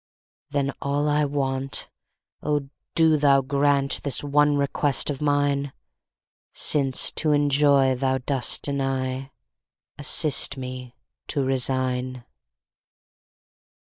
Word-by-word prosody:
Then 140 Hz, -1 st, -1 dB
all 145 Hz, +1 st, -1 dB
I 150 Hz, 0 st, +2 dB
want—O 135 Hz, +1 st, -4 dB, 0.3 s
do 160 Hz, -1 st, +4 dB
Thou 140 Hz, -2 st, +3 dB
grantThis 140 Hz, 0 st, +1 dB
one 145 Hz, 0 st, +2 dB
request 140 Hz, 0 st, +1 dB
of 140 Hz, -, -7 dB
mine!—Since 140 Hz, -1 st, -2 dB
to 155 Hz, -2 st, 0 dB
enjoy 140 Hz, -2 st, +3 dB
Thou 130 Hz, +1 st, 0 dB
dost 130 Hz, 0 st, 0 dB
deny, 135 Hz, -1 st, -2 dB, 0.7 s
Assist 145 Hz, 0 st, +2 dB
me 125 Hz, -1 st, -8 dB, 0.3 s
to 140 Hz, -3 st, 0 dB
resign. 130 Hz, -1 st, -1 dB
140 Hz, 85 wpm, -24 LUFS, 130-145 Hz, 0.7 s, do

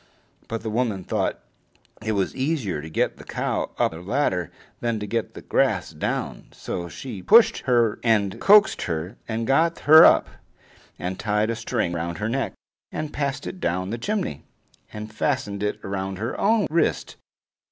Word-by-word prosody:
But 115 Hz, 0 st, -4 dB
the 110 Hz, -, -3 dB
woman 110 Hz, -5 st, -1 dB
thought -, -, -1 dB, 0.7 s
it 110 Hz, -1 st, -1 dB
was 100 Hz, -2 st, -1 dB
easier 130 Hz, -, -1 dB
to 80 Hz, -, -8 dB
get 80 Hz, -, 0 dB
the -, -, -11 dB
cow -, -, -2 dB
up -, -, +2 dB
the 80 Hz, +1 st, -9 dB
ladder 90 Hz, -, 0 dB, 0.3 s
than 115 Hz, -2 st, -1 dB
to 105 Hz, -, -4 dB
get 115 Hz, +2 st, -3 dB
the -, -, -9 dB
grass -, -, +1 dB
down, -, -, -3 dB
so 85 Hz, -1 st, -5 dB
she 105 Hz, -, -7 dB
pushed 225 Hz, -, +6 dB
her 120 Hz, -4 st, +3 dB
and 105 Hz, -4 st, +1 dB
coaxed 210 Hz, +1 st, +6 dB
her 85 Hz, +6 st, -3 dB
and 115 Hz, 0 st, -2 dB
got 165 Hz, +7 st, +2 dB
her 155 Hz, +2 st, +9 dB
up, -, -, +6 dB, 0.7 s
and 90 Hz, +1 st, -4 dB
tied 105 Hz, +1 st, +1 dB
a -, -, -2 dB
string 110 Hz, -5 st, -2 dB
round 85 Hz, 0 st, -3 dB
her 105 Hz, +1 st, -2 dB
neck, 135 Hz, +3 st, -1 dB, 0.4 s
and 155 Hz, -1 st, -4 dB
passed 140 Hz, 0 st, -2 dB
it 185 Hz, -, -6 dB
down 95 Hz, -, -1 dB
the 115 Hz, -, -3 dB
chimney, 195 Hz, -, -2 dB, 0.5 s
and 105 Hz, 0 st, -8 dB
fastened 110 Hz, -4 st, -1 dB
it 105 Hz, 0 st, -1 dB
to -, -, -6 dB
her 95 Hz, +3 st, -3 dB
own 215 Hz, 0 st, +3 dB
wrist. 170 Hz, -, 0 dB
110 Hz, 175 wpm, -24 LUFS, 95-135 Hz, 0.7 s, her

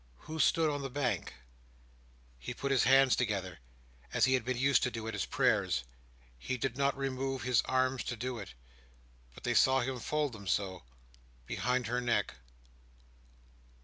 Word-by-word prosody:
Who 160 Hz, +1 st, -7 dB
stood 165 Hz, 0 st, +4 dB
on 145 Hz, -1 st, -1 dB
the 135 Hz, -, -4 dB
bank?— 130 Hz, -, -2 dB, 1.0 s
He -, -, -6 dB
put 140 Hz, -, -2 dB
his 130 Hz, -4 st, +3 dB
hands 135 Hz, 0 st, +6 dB
together, 95 Hz, -, -2 dB, 0.5 s
as -, -, +3 dB
he 130 Hz, -, +2 dB
had 130 Hz, -3 st, +2 dB
been 125 Hz, +1 st, -2 dB
used 135 Hz, +2 st, +3 dB
to 125 Hz, -, +1 dB
do 115 Hz, -2 st, -6 dB
at 110 Hz, -, -4 dB
his -, -, -2 dB
prayers. 65 Hz, -, +1 dB, 0.6 s
He 130 Hz, -, -3 dB
did 125 Hz, 0 st, -2 dB
not 140 Hz, 0 st, +1 dB
remove 135 Hz, -1 st, -2 dB
his 125 Hz, -1 st, +3 dB
arms 130 Hz, -1 st, +1 dB
to 120 Hz, -, -3 dB
do 125 Hz, +1 st, -4 dB
it; 95 Hz, -10 st, -9 dB, 0.8 s
but -, -, -13 dB
they -, -, 0 dB
saw 130 Hz, 0 st, +4 dB
him 130 Hz, +1 st, -3 dB
fold 150 Hz, +2 st, -1 dB
them 100 Hz, -3 st, -10 dB
so, 95 Hz, 0 st, -1 dB, 0.6 s
behind 125 Hz, -, -1 dB
her 120 Hz, +2 st, -1 dB
neck. 120 Hz, -, 0 dB
130 Hz, 170 wpm, -32 LUFS, 115-135 Hz, 1.0 s, hands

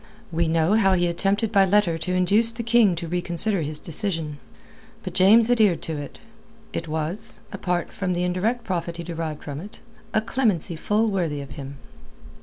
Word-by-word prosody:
We 165 Hz, 0 st, +1 dB
know 165 Hz, +3 st, +2 dB
how 200 Hz, -3 st, +4 dB
he 175 Hz, -1 st, +2 dB
attempted 195 Hz, +5 st, 0 dB
by 200 Hz, -3 st, +5 dB
letter 190 Hz, -3 st, +3 dB
to 180 Hz, +3 st, -2 dB
induce 205 Hz, +6 st, +3 dB
the 235 Hz, +1 st, -6 dB
King 230 Hz, -5 st, +4 dB
to 170 Hz, 0 st, -5 dB
reconsider 175 Hz, +3 st, -1 dB
his 150 Hz, 0 st, -3 dB
decision. 165 Hz, -4 st, 0 dB, 0.6 s
But -, -, -6 dB
James 220 Hz, +5 st, +5 dB
adhered 215 Hz, -8 st, +3 dB
to 160 Hz, -2 st, -4 dB
it. 145 Hz, -, -8 dB, 0.6 s
It 165 Hz, -, -4 dB
was 160 Hz, +5 st, -3 dB
apart 180 Hz, -2 st, -2 dB
from 185 Hz, -2 st, -2 dB
the 175 Hz, 0 st, -1 dB
indirect 200 Hz, +7 st, -1 dB
profit 170 Hz, -4 st, -3 dB
he 170 Hz, -, -5 dB
derived 165 Hz, -3 st, -5 dB
from 145 Hz, -1 st, -6 dB
it 200 Hz, +6 st, -10 dB, 0.3 s
a -, -, +3 dB
clemency 215 Hz, -, 0 dB
full 210 Hz, +6 st, +1 dB
worthy 170 Hz, -7 st, -1 dB
of 140 Hz, -2 st, -8 dB
him. 140 Hz, -1 st, -8 dB
180 Hz, 180 wpm, -24 LUFS, 165-210 Hz, 0.6 s, by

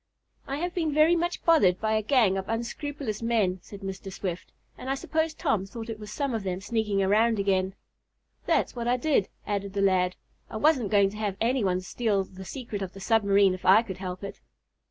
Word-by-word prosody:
"I 275 Hz, -, -2 dB
have 350 Hz, +3 st, -3 dB
been 325 Hz, -4 st, 0 dB
very 310 Hz, +3 st, +5 dB
much 345 Hz, +1 st, -2 dB
bothered 200 Hz, -, +5 dB
by 220 Hz, 0 st, 0 dB
a 215 Hz, -, +2 dB
gang 220 Hz, -4 st, +3 dB
of 190 Hz, 0 st, -4 dB
unscrupulous 235 Hz, 0 st, -4 dB
men," 215 Hz, -6 st, +1 dB
said 200 Hz, -1 st, -11 dB
Mr. 195 Hz, 0 st, -6 dB
Swift, 185 Hz, -2 st, -5 dB, 0.2 s
"and 260 Hz, -, -7 dB
I 270 Hz, -, +1 dB
suppose 315 Hz, +3 st, -1 dB
Tom 195 Hz, -3 st, 0 dB
thought 225 Hz, +3 st, -8 dB
it 220 Hz, -, -7 dB
was 210 Hz, -1 st, -9 dB
some 280 Hz, +1 st, -2 dB
of 225 Hz, -, -1 dB
them 185 Hz, -2 st, -3 dB
sneaking 205 Hz, -1 st, 0 dB
around 220 Hz, +4 st, +3 dB
again." 190 Hz, -1 st, 0 dB, 0.7 s
"That's -, -, +1 dB
what 235 Hz, -1 st, -3 dB
I 245 Hz, +1 st, +3 dB
did," 260 Hz, -6 st, +1 dB, 0.2 s
added 200 Hz, -1 st, -3 dB
the 200 Hz, -, -1 dB
lad. 185 Hz, -2 st, +2 dB, 0.3 s
"I 220 Hz, -, -5 dB
wasn't 260 Hz, -4 st, +3 dB
going 200 Hz, -1 st, +4 dB
to 210 Hz, -, -9 dB
have 205 Hz, -3 st, -2 dB
any 245 Hz, +1 st, +1 dB
one 185 Hz, -1 st, +1 dB
steal 205 Hz, 0 st, 0 dB
the 190 Hz, 0 st, -11 dB
secret 230 Hz, -3 st, -6 dB
of 190 Hz, -1 st, -5 dB
the 195 Hz, -, -10 dB
submarine 200 Hz, -2 st, +3 dB
if 185 Hz, -, -7 dB
I 200 Hz, +5 st, +6 dB
could 190 Hz, -6 st, -7 dB
help 185 Hz, 0 st, -6 dB
it." 200 Hz, -, -7 dB
210 Hz, 215 wpm, -27 LUFS, 195-240 Hz, 0.7 s, I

